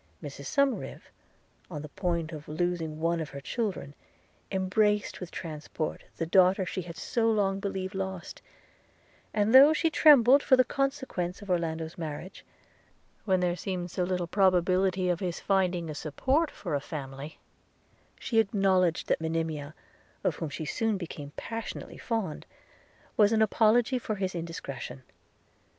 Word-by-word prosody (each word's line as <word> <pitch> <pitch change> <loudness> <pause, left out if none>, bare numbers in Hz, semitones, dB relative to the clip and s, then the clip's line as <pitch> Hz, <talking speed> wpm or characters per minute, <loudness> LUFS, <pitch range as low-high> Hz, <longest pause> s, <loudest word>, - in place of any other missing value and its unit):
Mrs 140 -1 -7
Somerive, 280 - 0 0.7
on 150 -4 -6
the 150 - -8
point 170 -2 -2
of 150 -2 -8
losing 160 -1 -2
one 170 +1 +1
of 155 -3 -4
her 140 - -7
children, 190 - -3 0.6
embraced, 205 +2 +1
with 180 - -6
transport, 155 -2 -5
the 165 - -1
daughter 185 +2 +4
she 185 - -3
had 170 -1 -9
so 230 +3 0
long 200 -3 +1
believed 195 -1 -3
lost; 190 -2 -5 0.9
and 210 +2 +1
though 280 +4 +9
she 325 +1 +1
trembled 280 -4 +7
for 260 - +5
the 255 - +6
consequence 260 -9 -2
of 200 - -5
Orlando's 165 -1 -2
marriage, 160 +3 -6 0.8
when 190 -3 +2
there 175 -1 +1
seemed 180 -1 -4
so 180 - -1
little 180 -1 -1
probability 185 0 +2
of 175 -1 +1
his 180 -3 -3
finding 180 -3 +1
a 155 - -4
support 265 - 0
for - - -6
a 145 - +2
family, 140 0 -7 0.8
she 225 - +1
acknowledged 195 -5 +2
that - - +1
Monimia, 160 -2 -2 0.5
of - - 0
whom 160 - -3
she 155 +2 -5
soon 220 +6 0
became 155 -5 -7
passionately 225 0 -6
fond, 225 -10 -3 0.7
was 210 -1 +5
an 220 -1 +4
apology 230 +4 +3
for 215 -2 -3
his 190 -2 -2
indiscretion. 140 -6 -6
185 Hz, 145 wpm, -29 LUFS, 160-210 Hz, 0.9 s, though